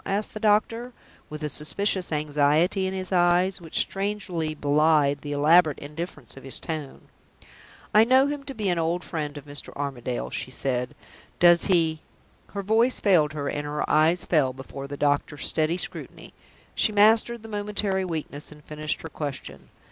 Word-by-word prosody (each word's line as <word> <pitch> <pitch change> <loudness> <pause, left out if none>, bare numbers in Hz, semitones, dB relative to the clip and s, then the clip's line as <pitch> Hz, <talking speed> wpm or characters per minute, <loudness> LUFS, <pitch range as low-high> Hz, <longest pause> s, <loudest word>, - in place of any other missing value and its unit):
asked 200 +2 -2
the 215 - -6
doctor, 225 +3 +1 0.4
with 150 0 -7
a - - 0
suspicious 180 +6 -1
anxiety 150 +5 +2
in 190 - -3
his 185 0 -5
eyes, 180 +1 +2
which 165 -2 -5
strangely 195 -6 -3
belied 145 -1 +2
the 145 - -6
elaborate 155 +2 +4
indifference 150 -3 -8
of 135 - -12
his 135 - -1
tone. 155 -4 -6 0.9
"I 215 - +7
know 260 +3 +5
him 285 0 -3
to 275 - -7
be 215 -3 -2
an 175 -2 +1
old 170 +2 -1
friend 150 -3 -4
of 145 - -10
Mr. 145 0 -5
Armadale's," 130 -4 -4
she - - -3
said. 125 -1 -2 0.4
"Does 175 0 +6
he 165 -4 +2 0.2
?" - - -35
Her 200 - -2
voice 225 +5 +2
failed 160 -7 +3
her, 145 -2 -3
and 145 - -2
her 150 0 -3
eyes 160 +3 +3
fell 140 -6 +2
before 135 +1 -8
the 145 0 -7
doctor's 145 0 0
steady 160 +2 +1
scrutiny. - - -7 0.4
She 215 - +2
mastered 220 +2 +4
the - - -9
momentary 205 -2 -1
weakness, 155 -5 -5
and 150 0 -14
finished 155 0 -4
her 160 - -6
question. 135 - -6
160 Hz, 170 wpm, -25 LUFS, 145-195 Hz, 0.9 s, I